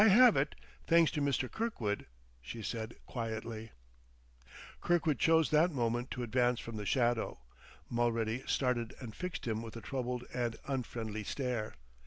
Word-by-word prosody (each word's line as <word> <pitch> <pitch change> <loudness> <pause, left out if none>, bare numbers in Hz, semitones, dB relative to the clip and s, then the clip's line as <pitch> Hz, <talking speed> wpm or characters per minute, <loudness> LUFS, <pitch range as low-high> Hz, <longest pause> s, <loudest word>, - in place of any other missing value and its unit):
"I - - +8
have 235 +3 +8
it, 140 +2 +1 0.3
thanks 165 -1 +6
to 150 - -1
Mr. 140 -2 +1
Kirkwood," 125 - -2 0.3
she 110 - -7
said 115 +1 -4
quietly. 115 -1 -4 1.1
Kirkwood 165 -6 +2
chose 160 -1 +4
that 155 +3 +5
moment 120 -2 0
to 125 - -3
advance 120 0 +2
from 115 -1 -6
the 105 -1 -4
shadow. 120 - +1 0.5
Mulready 115 0 0
started 125 -3 +1
and 115 -4 -7
fixed 180 -4 -4
him 110 -1 0
with 115 0 -7
a - - -7
troubled 125 -1 -2
and 120 -2 -1
unfriendly 115 -5 -3
stare. 120 - -2
120 Hz, 150 wpm, -34 LUFS, 115-140 Hz, 1.1 s, I